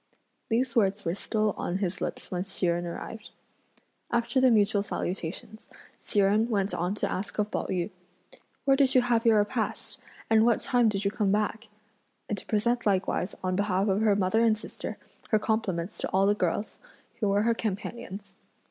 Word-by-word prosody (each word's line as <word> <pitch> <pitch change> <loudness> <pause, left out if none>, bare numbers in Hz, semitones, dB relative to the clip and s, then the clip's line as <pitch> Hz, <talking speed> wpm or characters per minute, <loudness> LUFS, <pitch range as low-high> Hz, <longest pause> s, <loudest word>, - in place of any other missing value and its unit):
These 240 +1 0
words 200 -3 +2
were 165 - 0
still 215 +2 0
on 180 - -1
his 190 -1 -3
lips - - -4
when 180 -1 -1
Hsi 190 -1 -3
Jen 175 0 0
arrived. 215 +5 -7 0.8
After 235 +2 +1
the 260 - +6
mutual 210 -2 +3
salutations, 190 +1 -5 0.3
Hsi 205 - 0
Jen 210 +4 +3
went 200 -3 0
on 180 +4 -1
to - - -1
ask 195 - -4
of 210 0 0
Pao - - -2
yü: 180 +2 -2 0.7
"Where 270 -1 +5
did 270 -1 +3
you 255 - +7
have 235 -1 +2
your 225 -1 +6
repast? 210 +2 -2 0.3
and 220 -1 +5
what 235 -1 +3
time 245 -3 +3
did 200 -1 -2
you 200 - +2
come 210 -2 0
back?" 215 +2 -1 0.6
and 210 - -1
to 200 - -11
present 235 +2 +1
likewise, 190 -1 0
on 185 0 0
behalf 200 0 +1
of 195 +2 +2
her 215 -2 +4
mother 205 +3 +2
and 220 -2 +4
sister, 220 - -7 0.3
her 215 - +4
compliments 210 -4 -1
to - - -2
all 190 +1 +3
the 205 - +4
girls, 205 +1 -2 0.4
who 210 - +1
were 200 +1 +2
her 230 +1 +3
companions. 210 -1 -5
210 Hz, 185 wpm, -28 LUFS, 195-225 Hz, 0.8 s, you